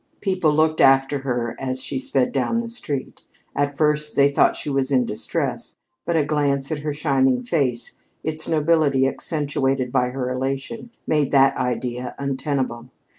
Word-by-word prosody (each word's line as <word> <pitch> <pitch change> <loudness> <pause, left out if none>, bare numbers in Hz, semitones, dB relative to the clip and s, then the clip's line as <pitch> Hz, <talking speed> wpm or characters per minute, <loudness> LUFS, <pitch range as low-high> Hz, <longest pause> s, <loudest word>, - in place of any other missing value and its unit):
People 185 -6 +1
looked 155 +1 +2
after 135 +1 +4
her 120 -3 -2
as 130 -1 -2
she 135 - -3
sped 130 0 0
down 135 - 0
the 235 0 -2
street. 145 - -4 0.3
At 145 0 0
first 150 -1 +1
they 140 0 +5
thought - - +3
she - - -5
was 135 -1 +1
in 130 -2 +3
distress, 105 - -3 0.3
but 170 - 0
a 155 -3 +2
glance 140 -1 0
at 155 - -1
her 150 +1 -3
shining 135 -4 +1
face, 125 -4 -1 0.2
its 155 0 -2
nobility 155 -4 +3
accentuated 135 -3 -1
by 125 0 +2
her 125 0 -3
elation, 135 - -3 0.2
made 150 -3 +1
that 135 -1 +5
idea 125 0 -3
untenable. 135 -3 -2
140 Hz, 160 wpm, -22 LUFS, 130-150 Hz, 0.3 s, they